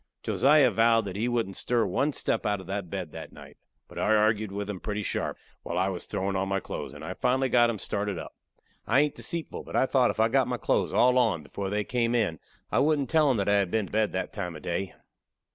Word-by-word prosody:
Josiah 140 -2 +4
vowed 115 +1 +3
that 95 -2 -5
he 110 +4 -1
wouldn't 115 -6 -1
stir 120 -2 +1
one 145 +2 0
step 115 - -1
out 105 -1 0
of 95 - -10
that 95 -1 -4
bed - - -5
that - - -8
night. - - -14 0.3
But - - -9
I 110 - +3
argued 110 -1 +2
with 100 0 -4
him 100 -3 -5
pretty 105 +1 -3
sharp, - - -2 0.2
while 85 - -4
I 95 +2 +2
was 90 -2 -5
throwin' 95 +1 -2
on 95 0 0
my 95 0 +1
clothes, - - -6
and - - -9
I - - -4
finally 130 +1 +1
got 120 -1 +4
him 115 - -2
started 100 -1 -3
up. - - -8 0.5
I 135 - +4
hain't 150 -1 +1
deceitful, 170 -2 -4
but - - -9
I - - +4
thought 130 -2 +3
if - - -3
I 110 - +5
got 130 +2 +2
my 125 -1 -2
clothes - - 0
all 125 +1 +4
on 105 -11 +1
before 95 +6 -5
they 105 +1 0
came 120 +1 0
in 100 -10 0 0.3
I - - +2
wouldn't 145 -2 +1
tell 155 -2 +4
'em 130 - +2
that 100 - -1
I 100 0 +4
had 100 -3 0
been 110 +1 0
to - - -13
bed 110 0 +1
that - - -3
time 90 -5 -4
of 75 - -10
day. 90 +1 -3
110 Hz, 255 wpm, -27 LUFS, 95-125 Hz, 0.5 s, I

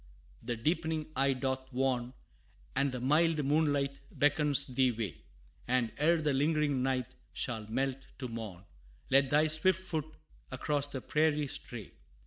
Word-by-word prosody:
The 120 +1 -2
deepening 160 +5 0 0.2
eve 135 -2 +1
doth 130 0 -2
warn, 125 -1 0 0.6
And 140 0 +2
the 125 - -4
mild 150 +3 +2
moonlight 145 -2 +1
beckons 145 -1 +3
thee 130 0 +2
away; 110 - -4 0.5
And, 125 -2 +1
ere 165 +3 +4
the 150 -2 +1
lingering 145 -1 +2
night 130 -2 -1 0.2
shall 110 -3 -2
melt 135 +3 -2
to 130 - -4
morn, 110 -6 -7 0.5
Let 135 0 +5
thy 150 +2 +4
swift 160 +4 +3
foot 160 -4 -3 0.4
across 145 -1 -1
the 135 -2 -5
prairie 150 0 +1
stray. 120 -6 -6
140 Hz, 140 wpm, -32 LUFS, 125-150 Hz, 0.6 s, Let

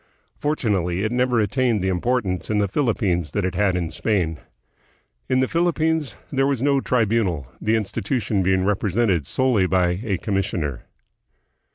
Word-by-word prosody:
Fortunately, 100 - 0
it 110 - -1
never 125 -1 +2
attained 110 -1 +1
the - - 0
importance 95 0 -1
in 110 - +1
the 100 -1 +2
Philippines 95 - 0
that 100 - 0
it 95 - -1
had 100 -3 +1
in 85 -2 -1
Spam. 85 -8 -1 0.9
In 130 0 +3
the 130 - +2
Philippines 160 -3 0 0.2
there 135 0 +2
was 140 -3 0
no 140 +1 +2
"Tribunal," 110 - +1 0.2
the 110 +1 +2
institu 110 +4 -1
tion 105 -2 0
being 95 0 +2
represented 100 - +1
solely 125 -8 +2
by 90 -1 +1
a 100 -6 -1
commissioner. 90 - -2
105 Hz, 155 wpm, -22 LUFS, 95-125 Hz, 0.9 s, In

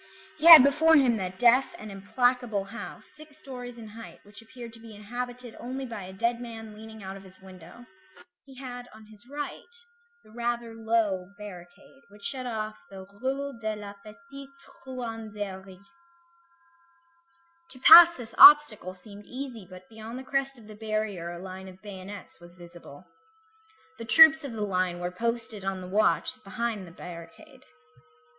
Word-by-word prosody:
He 325 - +2
had 325 -6 +12
before 310 +4 +4
him 255 -6 +3
that 185 -2 -5
deaf 245 +3 +3
and 215 -1 -10
implacable 220 +2 -1
house, 225 +4 -10
six 305 0 -12
stories 245 -4 -9
in 225 -2 -11
height, 225 +2 -12
which 205 +2 -14
appeared 235 0 -12
to 225 - -13
be 225 -1 -13
inhabited 245 +3 -7
only 260 +2 -6
by 225 -4 -7
a 185 - -10
dead 235 +5 -2
man 225 -2 -9
leaning 220 0 -12
out 190 +1 -7
of 195 - -14
his 190 -1 -16
window; 180 -8 -14 0.6
he 270 -1 -16
had 245 -2 -9
on 220 0 -15
his 215 +2 -16
right 290 +10 -7 0.5
the - - -20
rather 235 0 -4
low 220 -5 -1
barricade, 180 +5 -13
which 205 0 -18
shut 255 +3 -4
off 215 -2 -5
the 190 -1 -11 0.2
Rue 275 -1 -4
de 215 -1 -3
la 205 -1 -9
Petite 275 +5 -13 0.3
Truanderie; 210 -6 -8 1.8
to 255 - -14
pass 340 +3 +10
this 240 -3 -8
obstacle 285 -11 +7
seemed 205 +2 -14
easy, 250 -6 -8
but 185 0 -13
beyond 225 +2 -10
the 260 - -8
crest 275 0 -2
of 225 - -16
the 215 - -12
barrier 215 -5 -4
a 175 - -7
line 190 +1 -9
of 185 0 -14
bayonets 200 -1 -10
was 175 0 -14
visible. 175 -3 -14 0.9
The 230 - -7
troops 315 +5 +8
of 275 -4 -7
the 215 -2 -3
line 185 -2 -1
were 175 0 -4
posted 230 0 -3
on 190 -1 -3
the 180 - -9
watch 215 +5 0
behind 230 -6 -4
that 170 - -15
barricade. 180 - -12
220 Hz, 165 wpm, -27 LUFS, 195-250 Hz, 1.8 s, had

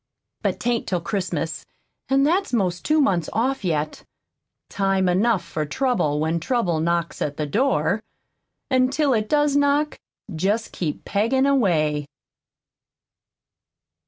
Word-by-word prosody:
But - - -1
'tain't 240 -1 -1
till 180 - 0
Christmas, 170 -3 -3 0.5
an' 270 +1 +3
that's 360 +7 +1
'most 185 -7 0
two 310 +1 +2
months 180 - +2
off 255 +2 0
yet. 155 -4 -2 0.6
Time 195 -1 +1
enough 190 +1 +2
for 155 -2 -3
trouble 155 - 0
when 160 +2 0
trouble 175 -4 0
knocks 170 +1 -1
at 145 -1 -2
the 150 - -1
door; 200 - +1 0.7
an' 255 0 +3
till 285 0 +1
it 215 -2 0
does 295 -1 +2
knock, 285 +1 +2 0.4
jest 205 +7 0
keep 155 -5 -4
peggin' 230 +7 +1
away." 160 - +2
200 Hz, 130 wpm, -23 LUFS, 165-265 Hz, 0.7 s, an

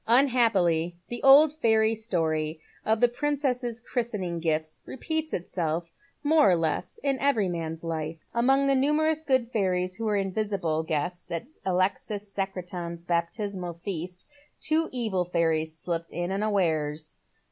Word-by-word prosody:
Unhappily, 220 - +3
the 240 0 -5
old 280 +3 +7
fairy 220 -6 +3
story 160 -8 -1 0.2
of 220 0 +1
the 245 - +7
Piincess's 250 -3 -1
christening 210 -9 -2
gifts 155 -1 -1
repeats 315 +4 -2
itself 170 -1 -2 0.3
more 300 -5 +5
or 180 - +5
less 165 -2 -2
in 275 -2 +1
every 270 -8 +2
man's 165 -2 -4
life. 160 -1 -3 0.2
Among 270 +4 +3
the 275 - +4
numerous 305 +3 +2
good 260 -5 +1
fairies 185 -4 0
who 225 - -3
were 210 -1 +1
invisible 195 -5 -1
guests 160 +2 -3
at 170 +6 -3 0.2
Alexis 200 +2 -1
Secretan's 180 -3 -4
baptismal 175 +1 -2
feast 180 0 -6 0.3
two 315 +1 +1
evil 220 -8 0
fairies 160 -2 0
slipped 165 0 -3
in 175 +2 -2
imawares. 160 -7 -1
190 Hz, 135 wpm, -27 LUFS, 170-240 Hz, 0.3 s, old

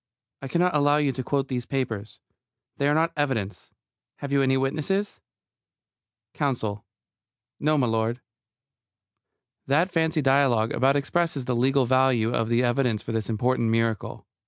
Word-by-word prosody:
I 135 - -6
cannot 175 +3 +1
allow 145 0 +3
you 145 -2 +1
to 130 0 -5
quote 140 +1 -1
these 125 -3 -4
papers. 110 -6 -4 0.6
They 140 - +1
are 145 - +2
not 165 +1 +2
evidence. 125 -9 -3 0.4
Have 140 - -7
you 140 0 +3
any 135 0 +2
witnesses? 155 +10 -2 1.1
COUNSEL: 110 -8 -2 0.8
No, 155 +1 +2
m'lud. 115 -2 0 1.5
That 160 +7 +2
fancy 160 -3 0
dialogue 135 -5 +3
about 135 +3 +2
expresses 145 -1 -1
the 125 0 -1
legal 130 +2 +2
value 125 -2 +2
of 115 -1 -1
the 120 +1 +2
evidence 120 -3 0
for - - -5
this 110 -1 -3
important 115 +1 0
miracle. 115 -1 -1
135 Hz, 140 wpm, -25 LUFS, 115-145 Hz, 1.5 s, allow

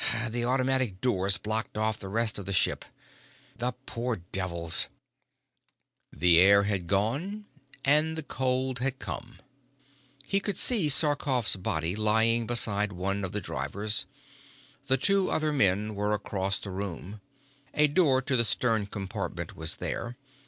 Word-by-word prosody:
The 120 +1 -2
automatic 130 -5 0
doors 95 -5 0
blocked 110 0 -4
off 110 0 -1
the 95 - -8
rest 110 +1 0
of 95 - -9
the 100 - -2
ship. - - +2 0.7
The 125 +1 -2
poor 120 0 -3
devils 85 -2 +2 0.7
" - - -49
The 85 -1 +4
air 100 +2 +6
had 100 -4 -2
gone 140 - -1 0.4
and 155 +3 +3
the 160 - -3
cold 130 -1 -2
had 130 +1 -1
come. 120 -2 -7 0.9
He 195 - +1
could 200 -2 -3
see 210 -12 +5
Sarkoff's 140 -6 +2
body 85 -1 -2
lying 110 +2 +2
beside 105 -3 +2
one 100 +3 -3
of 95 - -4
the 105 - -3
drivers. 100 +10 -3 0.8
The 130 -1 +3
two 195 +6 +3
other 155 -1 0
men 105 -4 +1
were 105 +1 -1
across 100 -1 -2
the 100 - -8
room. 100 +1 -6 0.5
A 150 - +5
door 145 -4 +2
to 130 - -1
the 120 - +4
stern 110 -2 +1
compartment 95 -2 -5
was - - -1
there. 120 +1 -5
110 Hz, 145 wpm, -28 LUFS, 100-130 Hz, 0.9 s, air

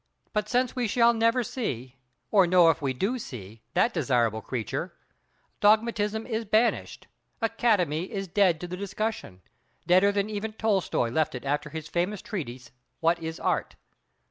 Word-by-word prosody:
But 210 -1 -1
since 250 +1 +1
we 245 -3 0
shall 235 +2 +4
never 230 +2 +2
see, 135 - -4 0.3
or 195 -4 +5
know 175 -2 +6
if 165 - -6
we 135 -2 0
do 200 - -1
see, 110 - -9
that 235 - +3
desirable 115 - +1
creature—dogmatism 210 - -1
is 225 -2 -2
banished, 220 +3 0 0.3
"Academy" 210 - +1
is 195 -3 -3
dead 180 -3 +3
to 175 - -4
the 180 - -5
discussion, 200 - -4 0.4
deader 185 +3 +5
than 200 0 0
even 215 +1 -4
Tolstoy 195 - 0
left 155 +1 0
it 125 - -7
after 145 +1 -1
his 160 -1 -6
famous 180 +3 -2
treatise 130 - -6 0.3
"What 170 +1 +2
is 160 0 -5
Art?" - - -1
195 Hz, 150 wpm, -27 LUFS, 150-220 Hz, 0.4 s, know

